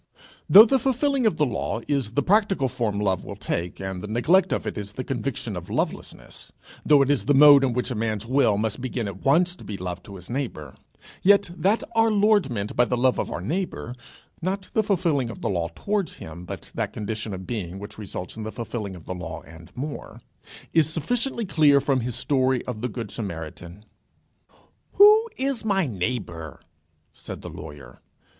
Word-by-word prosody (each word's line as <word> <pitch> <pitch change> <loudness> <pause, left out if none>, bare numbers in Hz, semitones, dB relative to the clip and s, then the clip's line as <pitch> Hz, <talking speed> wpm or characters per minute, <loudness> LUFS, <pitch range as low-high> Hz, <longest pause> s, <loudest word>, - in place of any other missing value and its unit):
Though 210 +3 +11
the 265 +3 +2
fulfilling 265 0 +1
of 170 - 0
the 150 - +3
law 120 -2 -2
is 135 -7 -1
the 145 - +1
practical 200 -8 +2
form 115 -5 -2
love 95 -3 0
will - - -7
take, 85 +1 -4
and 95 -1 -5
the 105 - -6
neglect 165 - +3
of - - -1
it - - -3
is 100 0 -6
the 130 - -4
conviction 120 -4 -3
of 90 0 -7
lovelessness; - - -4 0.3
though 145 -2 +5
it 135 - +1
is 145 - 0
the 145 - +3
mode 145 0 +8
in 130 -3 +1
which 125 +2 -2
a - - 0
man's 110 -1 -2
will 125 -4 +3
must 110 +2 -2
begin 120 -3 -3
at 95 -1 -8
once 175 +6 +3
to - - -13
be 105 - -6
love 90 -1 -5
to 100 +2 -11
his 90 -1 -9
neighbour, 120 - -4 0.5
yet, 200 -1 +4
that 200 +5 +1
our 225 0 +4
Lord 210 -6 +3
meant 105 -4 -4
by 120 - +5
the 125 0 -1
love 130 +1 +2
of - - -2
our - - -4
neighbour; 160 - -3 0.5
not 190 +2 -3
the 220 - +3
fulfilling 170 - 0
of 115 - -9
the - - -1
law 85 -4 -1
towards 205 -3 -1
him, 80 +3 -10
but 95 -3 -8
that - - -3
condition 110 0 -4
of 95 -1 -6
being 95 -4 -4
which 100 +2 -9
results 95 -3 -6
in 110 - -7
the 110 0 -5
fulfilling 110 -4 -5
of 85 - -13
the - - -4
law 90 -1 -7
and 80 +2 -14
more, 145 +3 -6 0.5
is 160 -2 +4
sufficiently 235 - -1
clear 150 -6 +4
from 135 -1 +1
his 120 -1 -3
story 130 -2 +1
of 115 -4 -5
the 125 - -2
good 115 -3 -6
Samaritan. 85 -1 -7 1.1
"Who 430 +3 +7
is 270 -3 -1
my 195 -4 +1
neighbour?" 90 - -4 0.5
said - - -9
the - - -7
lawyer. 75 -5 -11
125 Hz, 200 wpm, -24 LUFS, -, 1.1 s, Though